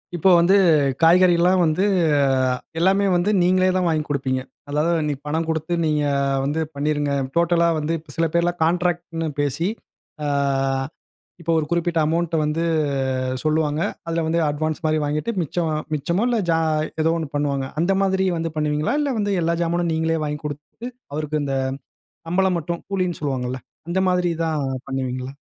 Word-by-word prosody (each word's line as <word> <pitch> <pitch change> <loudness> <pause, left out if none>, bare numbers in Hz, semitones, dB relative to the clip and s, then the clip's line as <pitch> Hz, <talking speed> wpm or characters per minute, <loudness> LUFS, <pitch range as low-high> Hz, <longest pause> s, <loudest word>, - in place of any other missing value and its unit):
இப்போ 175 +3 +3
வந்து 180 +4 +4 0.5
காய்கறிகள்லாம் 180 +1 +5
வந்து 165 +4 +2 0.9
எல்லாமே 195 +3 +3
வந்து, 175 +3 +1
நீங்களே 185 +1 +3
தான் 180 -2 +1
வாங்கி 155 -2 +1
கொடுப்பீங்க. 130 -2 -1 0.3
அதாவது 150 0 0
பணம் 160 +2 -1
கொடுத்து 160 +2 -1
நீங்க 150 -1 +1 0.4
வந்து 145 +3 -1 0.2
பண்ணிருங்க, 145 0 0 0.2
டோட்டலா 170 0 +3
வந்து 155 +2 -1
இப்ப 155 -2 -14
சில 165 - +2
பேர்லாம் 175 +1 +1
கான்ட்ராக்ட்னு 175 -1 -1
பேசி 145 +5 -1 0.6
அ, - - 0 1.1
இப்ப 170 - -8
ஒரு 155 - -2
குறிப்பிட்ட 170 -1 +1
அமௌன்ட் 165 +1 -1
வந்து 150 +2 -1 0.8
சொல்லுவாங்க. 155 0 +1 0.3
அதுல 165 0 -1
வந்து 165 +1 +1
அட்வான்ஸ் 155 +2 -2
மாரி 155 0 +2
வாங்கிட்டு 150 +10 -1
மிச்சம், 165 +2 -2 0.3
மிச்சமோ 170 +9 0
இல்ல 240 -2 +1
ஜா 165 - +3 0.4
எதோ 165 +1 +2
ஒன்னு 160 - -4
பண்ணுவாங்க. 140 -2 -1
அந்த 190 +3 +2
மாதிரி 190 0 +1
வந்து 165 0 -2
பண்ணுவீங்களா? 150 - 0
இல்ல 285 -2 0
வந்து 205 -1 0
எல்லா 170 +1 +1
ஜாமானும் 170 0 0
நீங்களே 160 0 0
வாங்கி 150 0 -3
குடுத்து, 150 - -7 0.3
அவருக்கு 150 0 -2
இந்த 135 -1 -1 0.7
சம்பளம் 185 +1 +2
மட்டும், 170 +1 -4
கூலின்னு 185 -3 -1
சொல்லுவாங்கள்ல, 130 -3 -2 0.3
அந்த 185 +2 0
மாதிரிதான் 165 -5 0 0.2
பண்ணுவீங்களா? 130 0 -3
165 Hz, 145 wpm, -22 LUFS, 150-175 Hz, 1.1 s, காய்கறிகள்லாம்